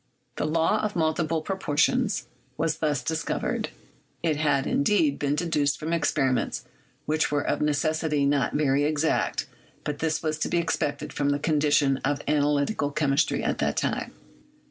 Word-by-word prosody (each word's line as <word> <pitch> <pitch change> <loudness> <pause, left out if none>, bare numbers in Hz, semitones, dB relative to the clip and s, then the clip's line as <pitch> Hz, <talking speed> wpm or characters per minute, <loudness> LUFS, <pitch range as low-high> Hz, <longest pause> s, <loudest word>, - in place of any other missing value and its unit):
The - - 0
"law 165 +7 +2
of 210 -1 -2
multiple 160 -1 0
proportions" 195 - +1 0.3
was 160 0 0
thus 150 -4 0
discovered; 160 0 -2 0.5
it 160 -3 +2
had, 145 -2 +1
indeed, 150 -2 +2
been 145 0 0
deduced 150 -4 +1
from 160 +2 -2
ex 165 -2 +1
periments 130 -4 0 0.4
which 155 0 +1
were 145 -1 0
of - - 0
necessity 150 0 +1
not 140 -2 +1
very 145 -1 +2
exact, 155 +1 0 0.4
but 145 -1 -3
this 160 0 -1
was 155 -1 -1
to - - -1
be - - +1
expected 165 -3 -1
from 145 -1 0
the 145 - +2
condition 145 -2 +2
of 140 +2 -1
analytical 145 +2 +1
chemistry 145 +1 +1
at - - -1
that - - 0
time. - - -1
150 Hz, 155 wpm, -26 LUFS, 145-160 Hz, 0.5 s, law